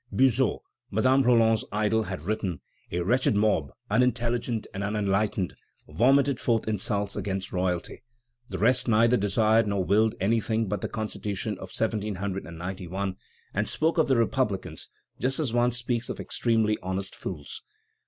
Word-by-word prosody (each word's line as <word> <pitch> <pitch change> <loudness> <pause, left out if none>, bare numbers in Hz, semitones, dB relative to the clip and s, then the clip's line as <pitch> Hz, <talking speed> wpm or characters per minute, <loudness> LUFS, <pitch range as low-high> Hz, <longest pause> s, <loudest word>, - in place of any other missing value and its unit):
Buzot, 130 0 +2 0.3
Madame 130 +6 +3
Roland's 115 -3 +4
idol, 110 +1 +1
has 75 - -5
written: 95 -4 -2 0.3
"A 90 - -1
wretched 120 +5 +2
mob, 100 -9 +2 0.2
unintelligent 120 0 +1
and 100 0 -3
unenlightened, 100 -2 0 0.3
vomited 130 - +3
forth 115 -2 +1
insults 100 -1 -1
against 95 -1 -3
royalty; 90 -1 -2 0.5
the 95 - -4
rest 125 +7 +2
neither 115 +2 +4
desired 110 +1 +3
nor 100 -2 0
willed 110 +3 +3
anything 110 +2 +1
but 100 -1 -2
the - - -3
Constitution 105 -1 -3
of 95 - -8
1791, 95 -3 -3 0.4
and 105 +1 0
spoke 165 +2 +1
of 160 - +4
the 135 - +3
republicans 110 -8 -1 0.3
just 135 +3 0
as 135 -7 -1
one 120 0 +3
speaks 120 -1 -2
of - - -5
extremely 110 -2 +1
honest 95 +1 -3
fools. 75 -7 -6
110 Hz, 140 wpm, -27 LUFS, 95-120 Hz, 0.5 s, Roland's